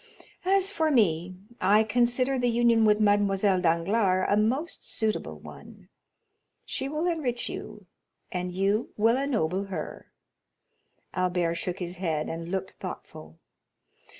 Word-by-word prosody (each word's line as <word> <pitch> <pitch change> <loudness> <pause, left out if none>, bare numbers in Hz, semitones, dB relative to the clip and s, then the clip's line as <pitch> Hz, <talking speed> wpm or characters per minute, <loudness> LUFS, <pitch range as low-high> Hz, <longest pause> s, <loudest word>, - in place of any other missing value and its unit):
As 390 +1 +2
for 320 -6 +1
me, 185 - +2 0.3
I 205 +4 +5
consider 245 +4 +1
the 245 0 +2
union 235 -1 +4
with 210 0 +4
Mademoiselle 205 -2 +3
Danglars 185 +3 +2
a - - +5
most 255 +10 0
suitable 220 -1 -2
one; - - -13 0.8
she 270 - -3
will 305 +3 -2
enrich 295 -9 -1
you, - - -8 0.5
and 180 -2 -3
you 195 +5 0
will 225 +3 +4
ennoble 205 - 0
her." 195 -1 -6 1.1
Albert 180 -2 0
shook 175 +1 -3
his 180 -1 -6
head, 160 -4 -1
and 165 +1 -5
looked 190 0 -3
thoughtful. 80 +1 -8
205 Hz, 125 wpm, -27 LUFS, 180-245 Hz, 1.1 s, I